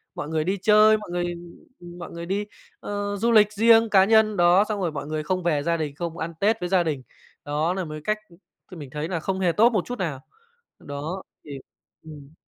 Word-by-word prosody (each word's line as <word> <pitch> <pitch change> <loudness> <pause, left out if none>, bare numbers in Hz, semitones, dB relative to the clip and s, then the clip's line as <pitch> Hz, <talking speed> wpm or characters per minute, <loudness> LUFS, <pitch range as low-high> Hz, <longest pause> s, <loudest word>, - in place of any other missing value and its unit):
mọi 150 - -5
người 160 -1 0
đi 190 +4 -1
chơi, 215 +1 +5
mọi 210 -3 -10
người 175 0 -1 0.7
mọi 170 - -8
người 170 0 -7
đi, 200 +4 -2 0.3
ờ, 205 0 -4
du 230 +4 +1
lịch 215 -2 +5
riêng 225 +1 +5
cá 190 -2 +5
nhân, 220 -1 +3
đó, 175 +3 +5
xong 210 - -2
rồi 175 -3 -1
mọi 145 -1 -6
người 155 0 -3
không 185 +3 -2
về 150 -4 0
gia 170 +2 0
đình, 150 -3 -4
không 170 +1 -5
ăn 165 0 -4
Tết 220 +3 +2
với 180 - -4
gia 185 -2 +3
đình. 145 -6 -3 0.4
Đó 150 +4 0
nà 190 -2 -3
một 155 - -8
cái 215 - +1
cách, - - -19
ừm, 175 0 -17
mình 145 -3 -9
thấy 150 +3 -4
là 170 -2 -3
không 190 +4 -3
hề 180 -3 +2
tốt 230 +7 +4
một 210 -7 -1
chút 245 -2 -6
nào. 155 -8 -3 0.6
Đó 150 +7 -6 0.2
thì 140 -2 -8 0.4
ừm. 150 -2 -12
175 Hz, 230 wpm, -24 LUFS, 155-205 Hz, 0.7 s, chơi